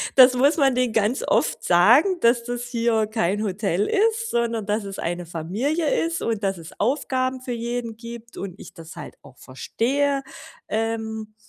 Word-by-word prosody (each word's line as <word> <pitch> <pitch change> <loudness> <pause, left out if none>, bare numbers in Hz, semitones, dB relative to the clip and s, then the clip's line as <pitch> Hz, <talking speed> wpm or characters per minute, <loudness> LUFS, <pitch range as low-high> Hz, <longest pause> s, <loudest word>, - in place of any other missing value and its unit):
Das 255 -1 +8
muss 285 +5 +4
man 270 -3 +4
denen 250 -3 +1
ganz 220 +5 +1
oft - - +1
sagen, 245 - +5
dass 235 0 +3
das 245 0 -4
hier 230 -3 0
kein 210 -1 -1
Hotel 200 -1 -1
ist, 450 +2 +1
sondern 230 -3 -1
dass 210 0 -1
es 195 0 -7
eine 175 +1 -3
Familie 235 - -1
ist 330 0 -3
und 220 -3 -2
dass 195 -2 0
es 165 -1 -10
Aufgaben 260 +1 0
für 255 - -6
jeden 235 -1 -4
gibt 235 0 -10
und 195 -1 -6
ich - - -12
das 165 -2 -11
halt - - -9
auch 130 - -17
verstehe, 275 - -1 0.5
ähm, 220 -1 -3
230 Hz, 170 wpm, -23 LUFS, 205-255 Hz, 0.5 s, Das